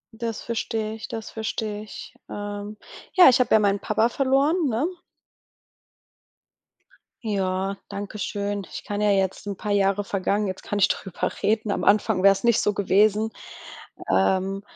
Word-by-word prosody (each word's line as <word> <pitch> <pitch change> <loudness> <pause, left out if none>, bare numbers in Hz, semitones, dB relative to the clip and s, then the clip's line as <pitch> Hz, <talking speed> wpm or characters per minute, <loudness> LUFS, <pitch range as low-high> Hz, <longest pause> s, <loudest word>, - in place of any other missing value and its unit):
Das 225 -1 -4
versteh 220 -1 -3
ich, 220 - -7
das 225 -1 -6
versteh 220 -1 -4
ich. 215 - -10 0.2
Ähm, 205 +1 -6 0.4
ja, 365 -6 +8
ich 255 - +4
hab 250 - +1
ja - - +7
meinen 205 -1 +2
Papa 220 +3 +1
verloren, 280 +6 +2
ne? 235 +5 0 2.4
Ja, 195 -1 -1
danke 200 +1 -6
schön. 200 0 -3
Ich - - -7
kann 205 0 -4
ja 210 0 +2
jetzt 195 +1 0
'n 200 - -3
paar 210 +2 -4
Jahre 200 0 +2
vergangen, 200 +1 -1
jetzt 190 -1 -4
kann 205 - -3
ich 195 - +4
drüber 190 -3 -2
reden. 215 0 +1
Am - - -2
Anfang 205 -1 +3
wäre 195 +1 +7
es 195 - -7
nicht 235 -2 +4
so 210 - +1
gewesen. 210 +2 +2 0.8
Ähm, 190 - +1
205 Hz, 160 wpm, -24 LUFS, 195-220 Hz, 2.4 s, ja